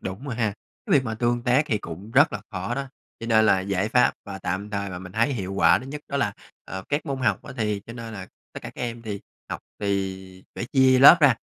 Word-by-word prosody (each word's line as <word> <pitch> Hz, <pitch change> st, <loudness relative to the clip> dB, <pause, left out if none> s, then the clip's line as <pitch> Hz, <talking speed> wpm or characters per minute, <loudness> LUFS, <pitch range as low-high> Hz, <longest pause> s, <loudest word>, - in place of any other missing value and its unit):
đúng 95 Hz, +8 st, -6 dB
rồi 125 Hz, -, -3 dB
ha. 110 Hz, -3 st, 0 dB, 0.3 s
Cái 200 Hz, -, -1 dB
việc 130 Hz, -, -2 dB
mà 110 Hz, -2 st, -3 dB
tương 120 Hz, +1 st, 0 dB
tác 125 Hz, +5 st, +3 dB
thì 110 Hz, -, +1 dB
cũng 95 Hz, +5 st, -9 dB
rất 145 Hz, +6 st, +5 dB
là -, -, -4 dB
khó 95 Hz, +3 st, -3 dB
đó, 140 Hz, 0 st, -4 dB, 0.3 s
cho 115 Hz, -, -5 dB
nên 110 Hz, -1 st, +4 dB
là 95 Hz, -3 st, +4 dB
giải 95 Hz, +1 st, -1 dB
pháp 125 Hz, +1 st, +4 dB
và 100 Hz, -1 st, -7 dB
tạm 100 Hz, +3 st, -3 dB
thời 100 Hz, -1 st, -3 dB
mà 90 Hz, -, -5 dB
mình 90 Hz, 0 st, -10 dB
thấy 115 Hz, +6 st, +2 dB
hiệu 95 Hz, -5 st, -4 dB
quả 95 Hz, -, +5 dB
thứ 130 Hz, -, -10 dB
nhất 150 Hz, +2 st, -6 dB
đó 140 Hz, -, -2 dB
là, 105 Hz, -8 st, +1 dB, 0.3 s
ờ, 95 Hz, +1 st, -6 dB
các 145 Hz, +3 st, -1 dB
môn 135 Hz, -2 st, -2 dB
học 130 Hz, -, +1 dB
á -, -, -9 dB
thì 105 Hz, -3 st, -1 dB
cho 115 Hz, -, -8 dB
nên 115 Hz, -2 st, -7 dB
là 95 Hz, -2 st, -7 dB, 0.3 s
tất -, -, -7 dB
cả -, -, -6 dB
các -, -, -9 dB
em 120 Hz, -1 st, -4 dB
thì 105 Hz, -3 st, -5 dB, 0.3 s
học -, -, -4 dB, 0.2 s
thì 95 Hz, -2 st, -3 dB
phải -, -, -4 dB
chia 130 Hz, -1 st, +5 dB
lớp 140 Hz, +6 st, +10 dB
ra, 140 Hz, -5 st, +6 dB
110 Hz, 265 wpm, -25 LUFS, 95-125 Hz, 0.3 s, lớp